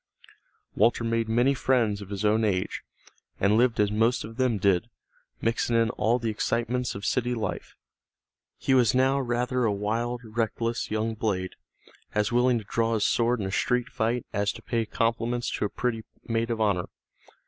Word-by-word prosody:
Walter 115 0 +2
made 115 -1 0
many 120 +4 +3
friends 120 -6 +1
of 100 - -9
his 100 +1 -3
own 110 +2 +3
age, 95 -4 -1 0.6
and 100 +2 +3
lived 120 0 +3
as 105 -1 +3
most 115 +3 +2
of 115 +2 -9
them 130 -4 +2
did, 100 +2 +2 0.5
mixing 115 +1 0
in 115 -1 +3
all 115 +3 +1
the 115 -2 -2
excitements 120 +3 -1
of 100 0 -6
city 125 -1 0
life. 110 - -4 0.8
He 135 - 0
was 125 -3 +4
now 135 +2 +3
rather 125 0 0
a 110 - +2
wild, 115 +4 -2
reckless 115 +1 -2
young 110 +1 -1
blade, 100 -4 -2 0.6
as 105 +1 +1
willing 125 0 +3
to 110 - -5
draw 115 +3 0
his 105 - +1
sword 120 0 +2
in - - -2
a 95 - -3
street 125 +5 0
fight 115 +2 -1
as 100 0 +1
to - - -12
pay 115 -2 -1
compliments 115 +2 -1
to - - -1
a - - -1
pretty 115 -1 -2 0.2
maid 115 0 0
of 115 -1 -2
honor. 100 -5 +1
115 Hz, 180 wpm, -27 LUFS, 105-120 Hz, 0.8 s, was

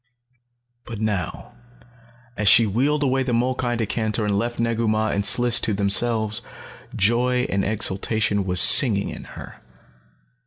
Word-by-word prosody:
But 115 -3 -9
now, 105 -4 -4 0.8
as 105 -2 -2
she 115 +3 +6
wheeled 140 +8 -1
away 135 -1 0
the 130 -2 -2
molkai 125 0 -1
decanter 110 0 -2
and 105 -1 -1
left 120 +4 -3
Negu 115 0 -1
Mah 110 0 0
and 100 - -2
Sliss 120 +3 +3
to 105 - -1
themselves, 110 +2 +1 0.5
joy 125 +4 0
and 100 0 -1
exultation 105 0 -1
was 90 -1 +1
singing 105 -7 +4
in - - -9
her. - - -12
110 Hz, 140 wpm, -21 LUFS, 100-120 Hz, 0.8 s, she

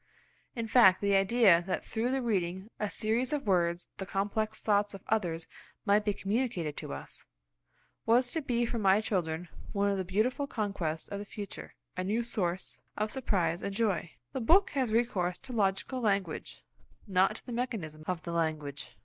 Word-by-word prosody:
In 230 -2 -2
fact, 220 -5 +6
the 200 0 +1
idea 195 -3 +5
that 185 - -2
through 225 +2 -1
the 265 0 0
reading 190 -2 -1
of 210 - 0
a - - -6
series 230 +7 0
of 295 -3 -1
words 175 -3 +1
the 190 - -3
complex 215 +3 -1
thoughts 205 -1 +2
of 195 - -11
others 175 -7 0 0.4
might 205 0 +4
be 210 - +1
communicated 195 - -1
to - - -5
us, 70 0 -8 0.8
was 245 +2 +4
to 320 - 0
be 240 -4 0
for 235 0 -2
my 195 -1 +5
children 175 -5 -1 0.3
one 200 0 +2
of 200 - 0
the - - 0
beautiful 220 +10 0
conquests 195 - -2
of 200 - -5
the - - -4
future, 205 -1 -8 0.2
a 185 - -2
new 215 +5 0
source 185 -6 -2 0.2
of 215 0 0
surprise 180 -10 0
and 200 - -4
joy 200 -7 0 0.2
The 260 - -2
book 365 - +5
has 260 -5 0
recourse 195 -6 +1
to 265 -2 -10
logical 210 +4 0
language, 195 -7 -1 0.4
not 190 +2 +3
to - - -11
the 250 - -7
mechanism 215 -11 -3
of 180 -3 -2
the 170 - -5
language. 155 -4 -2
200 Hz, 185 wpm, -31 LUFS, 180-230 Hz, 0.8 s, fact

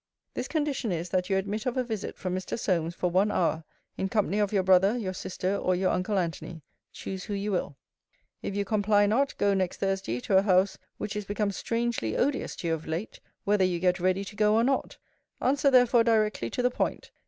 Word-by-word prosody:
This - - -3
condition 290 - -1
is, 170 0 -3
that 180 +1 0
you 195 - +2
admit 205 +4 -2
of 250 - -1
a 255 - +2
visit 220 -4 -5
from 185 -1 -3
Mr. 185 +4 -3
Solmes, 170 -6 -1
for 180 -1 -1
one 190 +4 +3
hour, 165 -4 0 0.4
in 190 - -1
company 210 -1 +1
of 205 -2 +1
your 195 -3 +2
brother, 190 +4 +4
your 190 -6 -3
sister, 185 +1 -3
or 185 -2 +1
your 185 +1 +1
uncle 190 +3 0
Antony, 165 -2 -3 0.3
choose 190 -1 -6
who 205 - -3
you 200 +1 -2
will. 175 -6 -2 0.6
If 200 - -4
you 200 0 0
comply 205 0 +3
not, 255 +7 +1
go 200 0 +2
next 185 -2 -1
Thursday 195 - -1
to 190 - +2
a - - +6
house 190 -1 +2 0.2
which 210 - -4
is 210 -1 -3
become 205 0 -1
strangely 230 - -2
odious 275 +1 0
to 170 - -4
you - - +2
of 160 -1 -5
late, 165 +7 -4 0.2
whether 205 -1 +2
you 180 -1 +1
get 180 +1 +1
ready 185 +2 +1
to 205 - -10
go 210 0 +3
or 225 - +4
not. 270 +2 0 0.4
Answer 280 +2 +2
therefore 245 -2 +5
directly 215 - +1
to 250 - -2
the 250 - +3
point. - - -2
200 Hz, 220 wpm, -28 LUFS, 185-220 Hz, 0.6 s, a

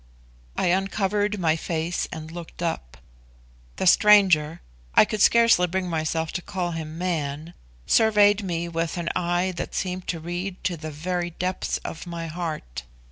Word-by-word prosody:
I 180 - +2
uncovered 200 +2 0
my 160 -4 +2
face 165 +1 -2
and 160 0 -7
looked 170 0 -8
up. - - -3 0.8
The - - -2
stranger 180 -6 +5 0.3
(I - - +8
could 215 -1 -3
scarcely 230 -7 +5
bring 185 +1 -2
myself 160 0 -1
to 180 - -3
call 180 -1 -3
him 160 -1 -6
man) 160 -2 -3 0.3
surveyed 210 -2 +4
me 170 -2 -2
with 165 +1 -2
an 170 -1 -2
eye 175 +1 0
that - - -5
seemed 185 -1 -3
to 165 - -2
read 175 +3 -5
to 180 - 0
the 155 -1 -7
very 175 +4 -3
depths 180 +2 -2
of 165 - -6
my 170 -1 -5
heart. 160 - -5
175 Hz, 155 wpm, -24 LUFS, 160-185 Hz, 0.8 s, I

